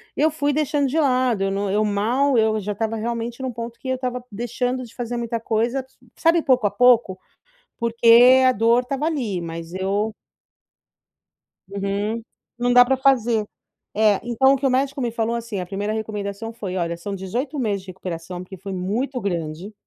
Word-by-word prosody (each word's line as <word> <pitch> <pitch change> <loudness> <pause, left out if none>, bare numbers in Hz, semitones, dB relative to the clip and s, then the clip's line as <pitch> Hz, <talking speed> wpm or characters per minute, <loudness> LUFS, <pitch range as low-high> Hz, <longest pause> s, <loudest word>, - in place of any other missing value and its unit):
eu 315 +2 +2
fui 290 -1 0
deixando 290 -1 +1
de 295 +5 0
lado, 255 -7 +2
eu 195 - 0
não 200 +1 -1
eu 210 +2 +2
mal, 235 +7 +1
eu 220 -1 +2
já 210 0 -4
estava 225 +2 -2
realmente 235 +2 -4
num 260 -1 -2
ponto 235 0 -7
que 260 - -6
eu 260 - +1
estava 250 -1 -4
deixando 245 +4 -2
de 230 - -13
fazer 240 -1 -4
muita 235 -1 -2
coisa, 230 +4 0
s 260 0 -11 0.2
sabe, 330 +1 +3
pouco 255 -6 +2
a 205 - -3
pouco, 235 -4 +4 0.6
porque 235 +2 +6
a - - +6
dor 230 +1 +3
estava 275 +3 -3
ali, 235 - -2
mas 165 0 -7
eu 200 +3 -1 1.6
Uhum, 200 +3 -2 0.4
não 245 0 +1
dá 245 0 +8
para 265 - +2
fazer. 240 -5 +2 0.5
É, 210 -2 +3
então 240 +3 +3
o - - +1
que 275 - -1
o - - +3
médico 275 +2 0
me 240 -2 0
falou 230 0 -1
assim, 230 -4 -4
a 180 - -5
primeira 205 +3 -3
recomendação 220 0 -4
foi: 200 -5 -5
"Olha, 170 -1 -1
são 200 +4 -5
18 240 +10 -4
meses 205 -6 -1
de 190 - -19
recuperação, 180 -1 -6
porque 190 +1 -10
foi 195 +2 -7
muito 225 +9 -2
grande, 175 0 -4
230 Hz, 190 wpm, -22 LUFS, 200-255 Hz, 1.6 s, dá